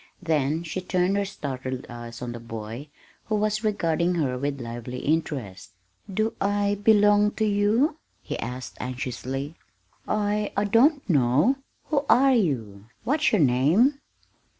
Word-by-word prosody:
Then 155 -1 0
she 170 +3 -4
turned 180 +1 +1
her 200 0 +1
startled 130 -8 -5
eyes 120 0 -8
on 120 - -4
the 120 - -7
boy, 115 +4 -7 0.4
who 215 - -1
was 215 +1 0
regarding 175 -4 +1
her 140 -7 0
with 140 +2 -3
lively 120 +1 -6
interest. 130 - -2 0.4
"Do 215 +3 0
I 205 0 +1
belong 210 -1 +5
to 220 - 0
you?" 215 +9 +2 0.2
he - - -5
asked 125 +2 -6
anxiously. 130 +3 -4 0.5
"I 210 0 0
I 200 - +3
don't 260 +8 +3
know. 150 - +3 0.3
Who 285 -2 +1
are 270 +2 +6
you 115 - -1 0.2
what's 295 +6 +2
your 210 - +3
name?" 155 - +3
170 Hz, 140 wpm, -25 LUFS, 125-210 Hz, 0.5 s, are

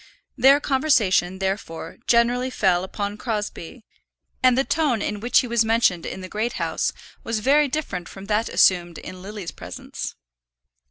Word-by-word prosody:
Their 270 +3 +6
conversation, 230 - +2
therefore, 190 -4 -4
generally 245 +2 +3
fell 185 -7 +1
upon 205 +2 -4
Crosbie, 215 -1 -5 0.6
and 255 -1 +4
the 270 - +3
tone 290 -6 +1
in 205 0 -3
which 240 +4 +3
he 250 - -5
was 235 -1 +2
mentioned 220 -6 +2
in 190 - -6
the 185 - -7
Great 215 +5 -2
House - - -1 0.3
was 230 0 -2
very 285 +7 +3
different 260 - -4
from 195 0 -10
that 215 +2 0
assumed 175 -3 +3
in 185 0 -9
Lily's 200 -2 -7
presence. - - -7
215 Hz, 155 wpm, -23 LUFS, 190-250 Hz, 0.6 s, Their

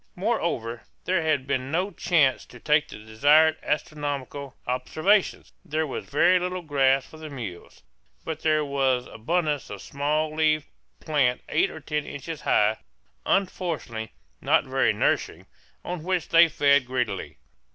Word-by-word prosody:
Moreover, 170 - -2 0.2
there 185 -2 +1
had 155 -4 0
been 130 -1 -2
no 180 +6 0
chance 150 -10 +2
to 120 - -14
take 150 +2 +2
the - - -10
desired 150 +8 +4
astronomical 145 -3 -3
observations. 155 +11 0
There 155 +1 -1
was 140 - -5
very 175 +5 +4
little 180 0 -3
grass 135 -3 +2
for 155 - -14
the 155 0 -8
mules; 110 - -8 0.4
but 160 -1 -4
there 155 -1 +2
was 135 -3 +1
abundance 150 +4 -2
of 105 - -5
a - - -13
small 150 +4 -1
leaved 155 -1 +2 0.3
plant 135 -5 +1
eight - - +2
or 160 - -9
ten 150 0 -3
inches 145 +3 -7
high 105 +1 +2 0.5
unfortunately, 165 - -1 0.3
not - - +3
very - - +2
nourishing - - -1 0.4
on 180 -2 -4
which 180 +1 -1
they 170 0 +7
fed 140 -4 +3
greedily. 125 -1 -3
150 Hz, 145 wpm, -25 LUFS, 130-160 Hz, 0.5 s, they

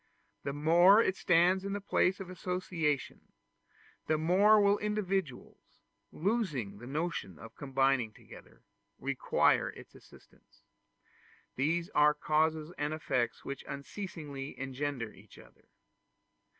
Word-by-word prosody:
The 140 - -3
more 170 +8 +5
it 190 -4 +2
stands 180 +1 +3
in 200 0 -3
the 205 - -2
place 195 -1 +1
of 195 - -7
associations, 175 -5 -3 0.7
the 155 - +2
more 195 +7 +5
will 205 0 +3
individuals, 195 -9 -4 0.3
losing 155 - -2
the 120 - -10
notion 150 - -3
of 115 +5 -12
combining 135 -4 +1
together, - - -16 0.3
require 140 -1 +1
its - - -13
assistance: - - -20 0.9
these 165 +7 0
are 150 0 +4
causes 155 +1 0
and 150 +1 -1
effects 125 -6 -2
which 140 -1 -6
unceasingly 145 -2 -7
engender 135 -3 -4
each - - -17
other. - - -18
155 Hz, 115 wpm, -31 LUFS, 135-185 Hz, 0.9 s, more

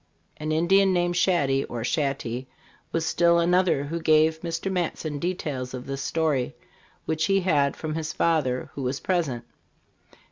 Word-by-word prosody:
An 155 0 -3
Indian 190 +4 +4
named 175 0 +1
Shaddy 145 -7 +2
(or 120 -1 -5
Shaty) 130 -3 -2 0.4
was 165 -1 -1
still 170 +1 +3
another 175 -3 +3
who 165 +4 -3
gave 160 0 +3
Mr. 170 +2 -3
Matson 160 -4 -2
details 140 -7 -3
of 125 - -7
this 135 0 -4
story, 150 -4 0 0.5
which 160 0 0
he 195 +1 +2
had 145 -6 +2
from 155 -1 -4
his 160 0 -3
father, 145 -7 0
who 140 - -6
was 130 +1 -2
present. 155 -10 -1
160 Hz, 150 wpm, -25 LUFS, 140-175 Hz, 0.5 s, Indian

